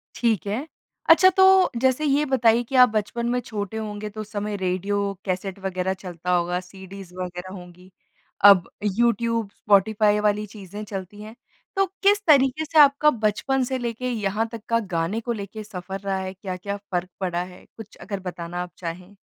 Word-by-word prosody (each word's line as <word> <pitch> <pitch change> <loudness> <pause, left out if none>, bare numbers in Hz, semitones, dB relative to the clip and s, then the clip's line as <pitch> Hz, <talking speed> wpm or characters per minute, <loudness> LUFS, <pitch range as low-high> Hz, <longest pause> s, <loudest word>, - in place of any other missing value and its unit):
ठीक 225 -7 0
है। 240 +10 -3 0.4
अच्छा 370 +3 +8
तो 380 - +7 0.4
जैसे 260 +3 +2
ये 290 +1 +2
बताइए 240 -4 +3
कि 265 +3 -6
आप 250 - +4
बचपन 215 +2 -2
में 250 +1 +1
छोटे 220 -3 -5
होंगे 210 -1 -5
तो 215 +1 -7
उस 215 - -10
समय 210 0 -3
रेडियो, 200 +2 -1
कैसेट 190 +1 -3
वग़ैरह 190 -1 -2
चलता 180 -1 -5
होगा 175 0 +1
सीडीज़ 190 0 -11
वग़ैरह 180 0 -6
होंगी। 180 0 -13 0.5
अब 195 -4 +7
यूट्यूब, 230 +1 +1
स्पॉटिफ़ाई 210 +1 +3
वाली 210 0 +1
चीज़ें 205 0 -9
चलती 200 0 -7
हैं। 215 +2 -10 0.4
तो 390 0 +3 0.2
किस 405 +1 +4
तरीके 280 0 +4
से 315 0 +2
आपका 290 +1 +6
बचपन 245 +3 0
से 260 +1 -2
लेके 240 +1 -3
यहाँ 215 -1 -1
तक 230 -2 -7
का 230 0 +3 0.2
गाने 165 +7 0
को 240 - -3
लेके 215 0 -7
सफ़र 195 -1 -7
रहा 195 -1 -2
है? 190 0 -5
क्या-क्या 195 +1 -5
फ़र्क 180 0 -1
पड़ा 175 -2 -1
है? 180 0 -13
कुछ 220 -2 -11
अगर 200 -2 -6
बताना 175 0 -6
आप 180 - -10
चाहें। 180 +3 -7
205 Hz, 175 wpm, -24 LUFS, 185-230 Hz, 0.5 s, अच्छा